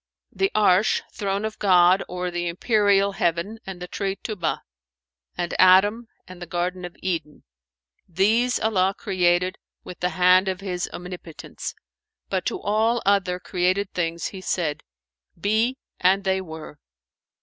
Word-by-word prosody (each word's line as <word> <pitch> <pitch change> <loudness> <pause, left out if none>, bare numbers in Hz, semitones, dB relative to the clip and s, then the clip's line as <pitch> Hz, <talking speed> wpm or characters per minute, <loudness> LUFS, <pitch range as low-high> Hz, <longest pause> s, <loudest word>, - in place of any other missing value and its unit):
"The 390 - 0
'Arsh, 205 0 +3
throne 200 +1 -2
of 220 - -5
God 185 -1 +5
or 180 0 -4
the 175 0 -2
empyreal 200 +1 +2
heaven 190 +3 -1
and 190 -2 -6
the 180 - -6
tree 195 +1 -3
Tϊbα[FN#439] 195 -5 -3 0.8
and 175 -1 -2
Adam 205 +5 +5 0.2
and 185 -1 -12
the 175 - -6
garden 180 +1 -2
of 175 - -9
Eden; 165 -5 -3 0.7
these 220 +8 +2
Allah 195 -3 +1
created 180 -1 +1 0.2
with 180 - -10
the 180 - 0
hand 185 +1 +5
of 185 -1 -2
His 185 -2 -3
omnipotence; 175 -2 -8 0.5
but - - -1
to 390 - -2
all 220 - +1
other 190 -2 +2
created 185 +2 -1
things 170 -2 -2
He 190 - -9
said, 165 -5 -2 0.6
'Be,'—and 205 -2 +1
they 190 -1 +1
were." 160 -4 -9
185 Hz, 140 wpm, -24 LUFS, 180-200 Hz, 0.8 s, God